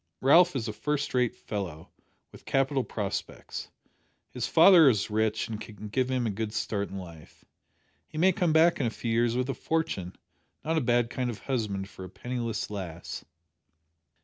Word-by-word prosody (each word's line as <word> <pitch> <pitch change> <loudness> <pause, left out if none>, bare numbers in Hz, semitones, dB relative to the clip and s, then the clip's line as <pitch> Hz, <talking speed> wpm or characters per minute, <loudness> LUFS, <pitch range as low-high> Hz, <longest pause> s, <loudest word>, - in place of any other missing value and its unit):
Ralph 170 +5 +6
is 120 -3 -2
a 110 - -3
first 145 +7 -2
rate 125 -2 +1
fellow, 90 -6 -6 0.4
with - - -14
capital 135 0 +1
prospects. 105 -5 -5 0.6
His 125 -2 -3
father 165 -2 +8
is 105 -3 0
rich 110 +1 0
and 110 -2 -5
can 105 -1 -9
give 130 +4 0
him 130 -2 0
a 110 - 0
good 105 +1 -4
start 100 -2 -2
in 95 - -6
life. 85 -4 -11 0.6
He - - -10
may 185 +4 +5
come 175 -2 +1
back 160 +2 +5
in 130 - +1
a - - +1
few 115 +1 -4
years 115 +1 +2
with 125 0 0
a 135 - -1
fortune 115 - -2 0.5
not 160 +1 +1
a - - -2
bad 120 -1 +2
kind 125 -1 -2
of 115 - -6
husband 105 -7 -2
for 95 - -11
a 95 - -8
penniless 120 -4 -4
lass." 85 -5 -6
115 Hz, 180 wpm, -28 LUFS, 105-135 Hz, 0.6 s, father